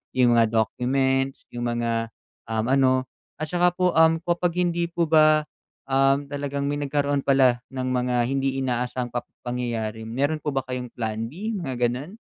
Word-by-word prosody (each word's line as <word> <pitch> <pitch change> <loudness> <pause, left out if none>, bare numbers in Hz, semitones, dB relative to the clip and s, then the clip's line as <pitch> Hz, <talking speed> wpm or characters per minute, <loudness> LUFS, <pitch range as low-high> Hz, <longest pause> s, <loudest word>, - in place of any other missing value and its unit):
yung 120 -2 +4
mga 115 - +6
documents, 135 +4 +1
yung 120 0 -4
mga, 115 -1 -1 0.4
um, 110 0 -1
ano, 130 -1 +3 0.3
at 155 - -3
tsaka 175 0 +3
po 180 0 +2 0.3
kapag 175 0 0
hindi 175 -1 +1
po 170 0 -1
ba, 155 -1 +6 0.5
um, 135 +1 +3
talagang 140 0 -2
may 145 - -1
nagkaroon 145 0 0
pala 130 -3 +4
ng 130 -1 -2
mga 125 0 0
hindi 135 0 0
inaasahang 125 0 -2
pap 120 - -3 0.2
pangyayari, 115 -3 -3
meron 140 +6 0
po 150 - -2
ba 135 - +1
kayong 125 -1 -5
Plan 110 -1 -3
B, 205 - -4
mga 130 -8 -1
gano'n? 145 - -6
135 Hz, 160 wpm, -24 LUFS, 120-145 Hz, 0.5 s, mga